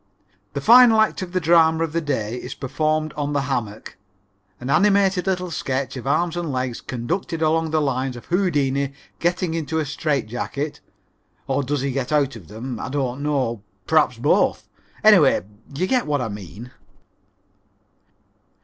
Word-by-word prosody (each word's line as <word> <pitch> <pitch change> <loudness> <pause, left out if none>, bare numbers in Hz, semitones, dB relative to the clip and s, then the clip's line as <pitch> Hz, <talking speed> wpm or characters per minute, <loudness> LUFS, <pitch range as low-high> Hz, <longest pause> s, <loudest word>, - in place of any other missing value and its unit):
The 140 - -3
final 235 - +7
act 220 -2 +2
of 185 -2 -5
the 185 - 0
drama 165 -1 +4
of 160 -2 -3
the 170 - 0
day 120 -7 -2
is - - -7
performed 155 +3 -1
on 145 0 -3
the 145 - +1
hammock 115 -8 -4 0.6
an 125 +3 -4
animated 195 +2 +3
little 180 -2 -1
sketch 135 -3 -2
of 130 0 -7
arms 170 +4 +1
and 170 -4 -3
legs 125 -2 -3
conducted 165 +7 -3
along 160 +1 +1
the 155 0 +1
lines 130 -2 -1
of 120 - -10
Houdini 140 -7 0 0.3
getting 175 0 0
into 160 -1 -2
a 155 - 0
strait 145 -2 -1
jacket, 140 +6 -4 0.7
or 135 +1 0
does 140 0 -2
he 140 0 -1
get 130 +1 -3
out 140 -3 +1
of 95 -8 -12
them? 115 +2 -6
I - - -5
don't 135 -1 -2
know, 130 -7 -1 0.2
perhaps - - +2
both. - - +1 0.4
Anyway, - - +5 0.3
you 175 +6 0
get 250 0 0
what 145 -1 +1
I 125 - -2
mean. 105 +4 -9
145 Hz, 165 wpm, -22 LUFS, 130-165 Hz, 0.7 s, final